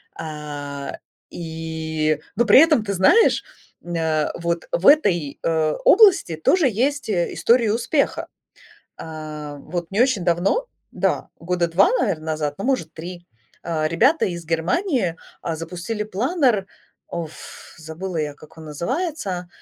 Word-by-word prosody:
А, 145 -2 -6 0.3
и 160 -2 -3 0.2
но 240 - +2
при - - +8
этом, 305 -7 +5
ты 200 - -2
знаешь, 190 - +4 0.4
м, 175 - -7
на 160 -2 0
вот 170 0 -2
в 175 - -1
этой, 180 - +4
э, 160 -2 +1
области 385 - +6
тоже 315 - +3
есть, 270 +5 -1
э, 175 -5 0
истории 235 -1 +3
успеха. 235 +7 0 0.7
А, 155 -2 -7
вот 170 +4 -6
не 200 +3 0
очень 245 -8 +2
давно 180 - +1 0.3
да, - - -1
года 175 0 -1
2, 180 +4 +4
наверно, 160 -6 -1
назад, 155 -2 -2
ну, 195 - -5
может 250 - 0
3, 175 +2 -8 0.4
а, 155 -2 -1
ребята 260 - +3
из 170 -2 -5
Германии, 175 - 0 0.3
а, 165 - -2
запустили 175 +6 -4
планер. 230 - +1 0.4
Оф, 160 -2 -8
забыла 165 +3 -6
я, 150 -2 -2
как 155 +2 -17
он 160 - -10
называется, 185 - -3
170 Hz, 140 wpm, -22 LUFS, 160-225 Hz, 0.7 s, при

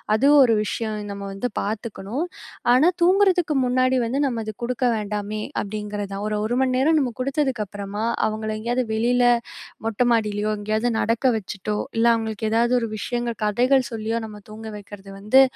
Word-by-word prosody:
அதுவும் 280 +5 +6
ஒரு 230 - +3
விஷயம், 215 0 -3
நம்ம 200 0 -6
வந்து 195 +6 -2
பார்த்துக்கணும். 220 - -3 0.5
ஆனா 270 +7 +5 0.2
தூங்குறதுக்கு 365 -3 +4
முன்னாடி 255 +1 +2
வந்து, 255 +4 -1
நம்ம 240 -4 -1
அது 215 - -4
குடுக்க 250 +1 -3 0.2
வேண்டாமே 210 0 -3 0.2
அப்படிங்குறது 205 -1 -5
தான். 200 +1 -4
ஒரு 210 0 -1
1 240 +3 -1
மணி 260 -1 +2
நேரம் 315 +5 +3
நம்ம 255 -3 0
குடுத்ததுக்கு 270 -4 0
அப்புறமா, 205 +2 -5 0.2
அவங்கள 215 0 -3
எங்கேயாவது 240 +3 -1
வெளில 245 +3 +2 0.6
மொட்டை 225 +2 +1
மாடிலயோ, 215 -2 +1
எங்கேயாவது 215 +3 0
நடக்க 230 0 0 0.2
வச்சுட்டோ, 210 +1 -4 0.2
இல்ல 230 - +3
அவங்களுக்கு 220 -1 -3
ஏதாவது 235 +2 +2
ஒரு 230 - -2
விஷயங்கள், 240 +1 -3
கதைகள் 250 +5 +2
சொல்லியோ, 225 0 -2
நம்ம 210 -1 -11
தூங்க 220 +1 -8
வைக்கிறது 200 -1 -11
வந்து, 215 +7 +5
225 Hz, 160 wpm, -23 LUFS, 210-250 Hz, 0.6 s, அதுவும்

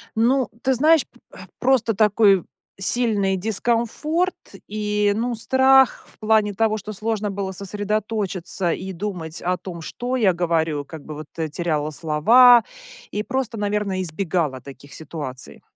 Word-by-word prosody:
Ну, 245 +2 +2
ты 265 0 +2
знаешь, 310 +4 +4
п - - -25 0.4
просто 245 -4 +2
такой 205 -3 +4 0.4
сильный 200 -2 +1
дискомфорт 235 - -1 0.3
и, 210 -1 0
ну, 240 +3 -1
страх 265 +3 +3
в - - -25
плане 215 -1 +2
того, 220 +1 +1
что 215 +1 -7
сложно 215 0 -2
было 195 -1 -4
сосредоточиться 200 -2 -2
и 190 +3 -4
думать 170 -4 -5
о 180 +1 0
том, 170 -3 -8
что 245 +9 -4
я 215 -7 +3
говорю. 165 -4 -1
Как 150 +1 -10
бы 155 - -8
вот, 155 0 -8
э, 160 -1 -2
теряла 155 -2 -2
слова 225 - +5 0.5
и 210 - -3
просто, 260 -3 -3
наверное, 205 -2 -1
избегала 165 -5 -2
таких 140 +1 -13
ситуаций. 145 -5 -7
205 Hz, 140 wpm, -22 LUFS, 170-225 Hz, 0.5 s, слова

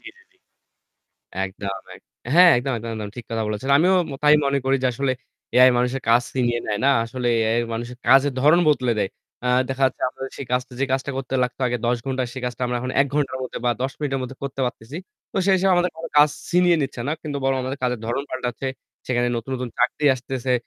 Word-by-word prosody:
জি, - - -17
জি, - - -21
জি। - - -35 1.1
একদম, 100 +1 -5 0.2
এক - - -15 0.3
হ্যাঁ 180 +1 +8
একদম, 130 +2 -1
একদম, 115 +1 -6
একদম 105 -2 -5
ঠিক 120 - -7
কথা 115 -1 -1
বলেছেন। 105 +6 -3
আমিও 180 +4 +4 0.2
ম - - -5
তাই 150 0 +6
মনে 140 0 +1
করি 135 +1 +3
যে - - +3
আসলে 135 +2 0 0.4
এআই 130 +1 +8
মানুষের 125 +2 -1
কাজ 120 +2 +5
ছিনিয়ে 120 -2 +1
নেয় 105 -1 -1
না। 140 - +5
আসলে 120 +1 -3
এআই 110 +1 +1 0.2
মানুষের 120 +2 -5
কাজের 135 +2 +5
ধরণ 155 +6 +5
বদলে 130 -5 +2
দেয়। 95 - 0 0.3
আ - - 0 0.2
দেখা 135 0 -3
যাচ্ছে 130 - -5
আপনার 130 - -8
সেই 140 - -6
কাজ 125 0 +2 0.2
যে - - +3
কাজটা 135 +1 -1
করতে 135 0 -4
লাগতো 125 +1 -3
আগে 120 0 0
১০ 120 +1 +2
ঘন্টা 130 -1 -1
সে - - -5
কাজটা 125 0 -4
আমরা 125 0 -1
এখন 130 +1 -3
১ 140 - +4
ঘন্টার 140 -3 0
মধ্যে 130 - -5
বা 120 - +4
১০ 130 0 -1
মিনিটের 135 -3 -2
মধ্যে 130 +1 -7
করতে 135 0 -4
পারতেছি। 125 +3 -7 0.4
তো - - -7
সেই 195 - +5
হিসেবে 190 +1 +2
আমাদের 175 0 +2
কোন 165 - -8
কাজ 150 +1 +7 0.2
ছিনিয়ে 175 -1 +4
নিচ্ছে 135 -3 -4
না। - - +1
কিন্তু 145 -2 -4
বরং 135 0 +2
আমাদের 130 +2 -4
কাজের 125 -2 -1
ধরন 120 +4 -1
পাল্টাচ্ছে। 130 +1 -3 0.4
সেখানে 120 -1 +1
নতুন, 115 +3 -5
নতুন 125 0 -4
চাকরি 150 - +1
আসতেছে। 130 0 -3
130 Hz, 225 wpm, -22 LUFS, 120-140 Hz, 1.1 s, হ্যাঁ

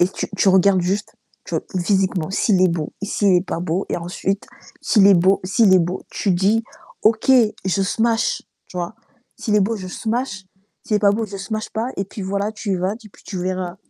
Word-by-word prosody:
et 175 - +4
tu - - -4
tu 195 - +3
regardes 190 0 +5
juste, 195 +4 -2 0.3
tu - - -6
vois? - - -1 0.2
Physiquement, 190 -3 +1
s'il 195 -1 +2
est 185 - +5
beau, 165 -3 -3
s'il 200 -1 +2
est 180 +2 0
pas 165 - -3
beau 180 +2 -2
et - - 0
ensuite, 185 +3 -3 0.3
s'il 205 -4 +4
est 200 - +7
beau 185 +3 +3
s'il 200 +1 +4
est - - +7
beau, 175 +2 -2
tu 200 - 0
dis: 200 +6 +2 0.4
«OK, 220 +4 +3 0.3
je 190 +1 +1
smash,», 225 +3 0 0.2
tu 180 - -11
vois? 175 +5 -4 0.4
«S'il 215 - -1
est 210 - +5
beau, 220 +3 +1
je 185 - -7
smash, 220 -2 -3 0.4
s'il 215 -5 +2
est - - +2
pas 205 -1 +4
beau, 220 +1 -1
je 200 - -7
smash, 215 +2 -4
pas», 230 +4 -2
et 195 - -1
puis 200 +1 -8
voilà, 200 +2 -1
tu 215 -2 -4
y 185 - +1
vas 185 +3 -1
et 220 -2 -13
puis, - - -21
tu 190 - -5
verras. 185 0 -3
195 Hz, 225 wpm, -21 LUFS, 185-215 Hz, 0.4 s, est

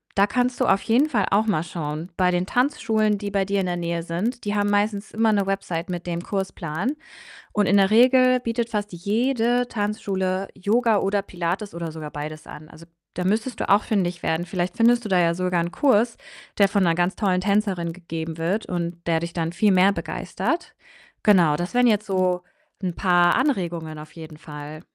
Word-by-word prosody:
da 200 +1 +4
kannst 250 +1 0
du - - +4
auf 195 +1 +2
jeden 260 +7 +3
Fall 210 -8 +1
auch 215 +3 +3
mal 165 -6 +1
schauen 160 +1 -5
bei 180 -1 +3
den 180 +1 0
Tanzschulen, 220 -4 +1
die 200 0 -5
bei 195 -1 +1
dir 200 0 0
in - - -2
der 175 -1 -2
Nähe 170 -1 -2
sind. 210 +9 -3
Die 205 - -1
haben 205 0 +1
meistens 205 0 0
immer 220 0 +2
'ne 200 -1 +1
Website 185 -2 -3
mit 175 -1 -4
dem 170 -1 -3
Kursplan 190 - -3 0.6
und 210 -1 +2
in 200 - +4
der 195 +1 +4
Regel 255 +2 +5
bietet 230 0 -2
fast 210 -2 -3
jede 235 +6 0
Tanzschule 195 -3 -2
Yoga 220 +2 +2
oder 200 +1 +1
Pilates 185 +2 -4
oder 170 -1 -5
sogar 155 -2 -7
beides 155 +1 -7
an. 155 +1 -10
Also, 165 +1 -14 0.3
da 180 - -3
müsstest 220 +6 -1
du - - -3
auch 200 +2 +5
fündig 180 -4 -1
werden. 160 +2 -1
Vielleicht 180 0 -3
findest 240 +1 +4
du - - -4
da 185 - +3
ja 170 -1 +3
sogar 180 -1 0
'n 170 - -4
Kurs, 235 -1 +2 0.4
der 200 -1 +5
von 200 -1 +1
'ner 165 -1 +2
ganz 175 +1 0
tollen 185 -4 +1
Tänzerin 195 -4 0
gegeben 165 -2 -6
wird 180 +7 -1
und 170 -1 -4
der 165 -1 +1
dich 170 0 -4
dann 165 -1 -2
viel 200 +3 +3
mehr 190 +2 +5
begeistert. 340 - -3 0.5
Genau, 175 -8 +5
das 175 +6 -4
wären 245 0 +4
jetzt 210 -1 +2
so 185 -2 0 0.4
'n 180 -2 -2
paar 175 -2 +3
Anregungen 175 - -1
auf 155 - -11
jeden 160 -2 -10
Fall. 150 -1 -9
190 Hz, 200 wpm, -23 LUFS, 170-215 Hz, 0.6 s, Regel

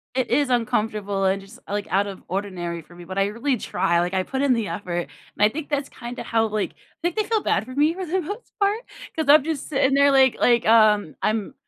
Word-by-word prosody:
it 260 - 0
is 275 +1 +2
uncomfortable 210 -4 0
and 195 +1 +1
just, 210 +6 -14
like, 205 0 -2
out 200 +2 +2
of 195 -2 -8
ordinary 175 -3 -4
for 175 +3 -18
me, 175 - -11
but 190 +2 -7
I 195 - +3
really 235 +5 -1
try, 170 -4 0
like 175 +2 -1
I 185 0 +1
put 265 +5 -3
in 275 -3 +3
the 225 -4 -1
effort, 175 -3 -3
and - - -9 0.4
I - - +4
think 305 +5 -6
that's 285 -1 -1
kinda 240 0 -7
how, 225 -1 +1
like 215 -1 -2
I - - -29 0.3
think 345 -1 0
they 430 - +1
feel 430 0 0
bad - - +1
for 255 +1 -9
me 300 +3 +3
for 375 0 -5
the 365 +3 -1
most 410 +9 -7
part 405 +2 +2 0.4
'cause 315 - -1
I'm 295 -1 +8
just 315 -3 -3
sitting 270 -2 +2
there, 280 0 +5
like 265 -2 +5
like, 240 -1 +3
um, 215 -6 +4
I'm 215 +2 -1
230 Hz, 245 wpm, -23 LUFS, 195-280 Hz, 0.4 s, I'm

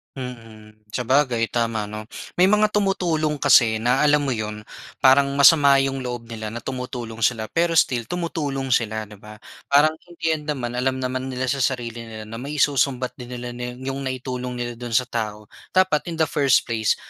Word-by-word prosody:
Mhm, 110 -4 -10
sabagay 125 -1 +2
tama 115 -2 0
'no. 110 +1 -8 0.3
May 185 - +6
mga 210 0 +3
tumutulong 175 -7 +1
kasi 115 -3 +5
na 125 +3 +2
alam 145 0 +3
mo 135 - 0
'yon, 105 -1 -5 0.4
parang 140 +1 +6
masama 140 -1 +7
'yong 135 0 -2
loob 120 -2 -5
nila 110 -1 -5
na 115 - -6
tumutulong 125 -3 -5
sila 110 -1 +1
pero 170 0 +1
still 120 -5 +2
tumutulong 145 -6 -3
sila, 110 -2 0
'di 105 -1 -14
ba? 105 0 -11 0.3
Parang 150 +3 +5
in 175 - -15
the - - -2
end 150 -1 -5
naman 125 -5 -3
alam 130 +1 0
naman 130 +1 -2
nila 130 0 -2
sa 140 - -2
sarili 120 -3 -2
nila 110 -1 -8
na 115 +2 -8
may 145 +3 -5
isusumbat 135 -3 +1
din 125 0 -8
nila 120 0 -6
na 125 0 -6
'yong 135 +1 -4
naitulong 125 -1 -4
nila 120 0 -3
do'n 120 -2 -4
sa 125 - +3
tao. 105 -3 -4 0.3
Dapat 185 -5 +3
in 165 - -4
the 160 - +3
first 140 -4 +3
place 110 -2 +1
125 Hz, 190 wpm, -22 LUFS, 115-140 Hz, 0.4 s, masama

